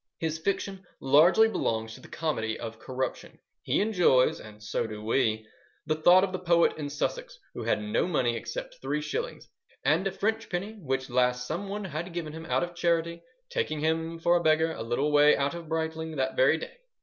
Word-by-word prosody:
His 160 Hz, -1 st, -2 dB
fiction 195 Hz, +2 st, -2 dB, 0.2 s
largely 160 Hz, +11 st, +5 dB
belongs 110 Hz, -, -2 dB
to -, -, -12 dB
the -, -, -13 dB
comedy 110 Hz, -9 st, -2 dB
of 115 Hz, -1 st, -7 dB
corruption. 130 Hz, +1 st, -4 dB, 0.2 s
He -, -, +1 dB
enjoys—and 130 Hz, -, +2 dB
so 105 Hz, -, -2 dB
do 105 Hz, -1 st, -7 dB
we—the 110 Hz, +5 st, -2 dB
thought 175 Hz, +4 st, +6 dB
of 195 Hz, -, 0 dB
the 185 Hz, -, -3 dB
poet 170 Hz, -2 st, +3 dB
in 150 Hz, -2 st, -5 dB
Sussex -, -, -3 dB, 0.2 s
who -, -, -6 dB
had -, -, 0 dB
no 210 Hz, -4 st, 0 dB
money 125 Hz, -9 st, +1 dB
except -, -, -6 dB
three 150 Hz, -, -1 dB
shillings, 475 Hz, -, -4 dB, 0.4 s
"and 195 Hz, -, +3 dB
a -, -, -1 dB
French 220 Hz, +2 st, -2 dB
penny, 190 Hz, +4 st, -3 dB
which 135 Hz, -3 st, -2 dB
last 125 Hz, 0 st, +2 dB
some 180 Hz, +8 st, -4 dB
one 205 Hz, +1 st, -4 dB
had 170 Hz, +1 st, -5 dB
given 160 Hz, -3 st, -4 dB
him 160 Hz, 0 st, -8 dB
out -, -, +1 dB
of 175 Hz, 0 st, -5 dB
charity, 170 Hz, -1 st, 0 dB, 0.3 s
taking 155 Hz, -, -1 dB
him 160 Hz, +1 st, -1 dB
for 170 Hz, +1 st, +3 dB
a 175 Hz, -, +2 dB
beggar 160 Hz, +1 st, +3 dB
a -, -, -6 dB
little 120 Hz, +6 st, 0 dB
way 150 Hz, 0 st, +6 dB
out 140 Hz, +2 st, 0 dB
of 170 Hz, -2 st, -8 dB
Brightling 160 Hz, 0 st, -3 dB
that 130 Hz, -1 st, -1 dB
very 135 Hz, +5 st, +4 dB
day." 160 Hz, -, -9 dB
160 Hz, 195 wpm, -28 LUFS, 130-180 Hz, 0.4 s, thought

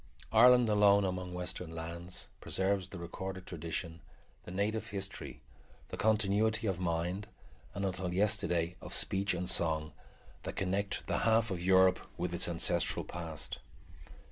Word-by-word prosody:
Ireland 125 Hz, +1 st, +7 dB
alone 100 Hz, -1 st, +5 dB
among 90 Hz, -1 st, -3 dB
western 90 Hz, -1 st, -4 dB
lands 85 Hz, +2 st, -5 dB
preserves 95 Hz, -1 st, -1 dB
the 95 Hz, -, -8 dB
recorded 95 Hz, +2 st, -6 dB
tradition, 85 Hz, 0 st, -5 dB, 0.4 s
the -, -, -9 dB
native 105 Hz, +4 st, -1 dB
history, 100 Hz, -2 st, -6 dB, 0.5 s
the -, -, -5 dB
continuity 110 Hz, +1 st, +2 dB
of 95 Hz, -4 st, -1 dB
mind, 90 Hz, +3 st, -2 dB, 0.5 s
and, 100 Hz, -, -2 dB
until 95 Hz, -1 st, -2 dB
yesterday, 90 Hz, -3 st, +1 dB
of -, -, -4 dB
speech 95 Hz, -1 st, +2 dB
and 90 Hz, +1 st, -3 dB
song, 80 Hz, -4 st, +1 dB, 0.5 s
that -, -, -6 dB
connect 95 Hz, +2 st, -1 dB
the -, -, 0 dB
half 115 Hz, -1 st, +3 dB
of 90 Hz, -2 st, -3 dB
Europe 95 Hz, 0 st, +5 dB, 0.2 s
with 90 Hz, 0 st, -2 dB
its 85 Hz, -, +3 dB
ancestral 85 Hz, 0 st, +1 dB
past. 80 Hz, -4 st, -5 dB
95 Hz, 140 wpm, -33 LUFS, 85-100 Hz, 0.5 s, Ireland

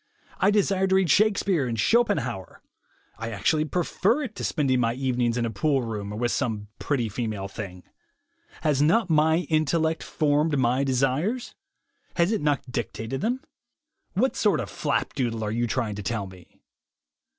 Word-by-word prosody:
I 195 Hz, -, +4 dB
desire 195 Hz, -2 st, +2 dB
to 190 Hz, -, +3 dB
read 190 Hz, -4 st, +3 dB
Shakespeare 200 Hz, -8 st, +3 dB
and 115 Hz, -2 st, -3 dB
Schopenhauer; 125 Hz, -, 0 dB, 0.6 s
I 115 Hz, 0 st, -4 dB
actually 150 Hz, +9 st, +1 dB
prefer 185 Hz, -, +1 dB
it 240 Hz, -6 st, -5 dB
to -, -, -7 dB
spending 135 Hz, -5 st, +1 dB
my 115 Hz, -1 st, +1 dB
evenings 125 Hz, -2 st, 0 dB
in 120 Hz, -, 0 dB
a 115 Hz, -, -2 dB
poolroom 115 Hz, -4 st, -1 dB
or -, -, -5 dB
with 120 Hz, +1 st, 0 dB
some 110 Hz, -6 st, -2 dB
pretty 130 Hz, -6 st, 0 dB
female 110 Hz, -3 st, -3 dB
thing. 95 Hz, -3 st, -8 dB, 0.8 s
Has 145 Hz, -3 st, +2 dB
not 175 Hz, +5 st, +3 dB
my 160 Hz, +3 st, +3 dB
intellect 160 Hz, +1 st, +1 dB
formed 150 Hz, 0 st, +1 dB
my 130 Hz, +1 st, +2 dB
desires? 135 Hz, -, 0 dB, 0.6 s
Has 170 Hz, +2 st, +2 dB
not 145 Hz, -2 st, +1 dB
it 125 Hz, -, -11 dB
dictated 120 Hz, +1 st, -4 dB
them? 245 Hz, +5 st, -1 dB, 0.7 s
What 250 Hz, +8 st, +1 dB
sort 205 Hz, -7 st, +2 dB
of -, -, -4 dB
flapdoodle 125 Hz, -6 st, -1 dB
are 105 Hz, -, -2 dB
you 120 Hz, +2 st, 0 dB
trying 115 Hz, -2 st, -1 dB
to 105 Hz, -, -6 dB
tell 110 Hz, 0 st, -2 dB
me? 90 Hz, -2 st, -15 dB
135 Hz, 160 wpm, -25 LUFS, 115-170 Hz, 0.8 s, I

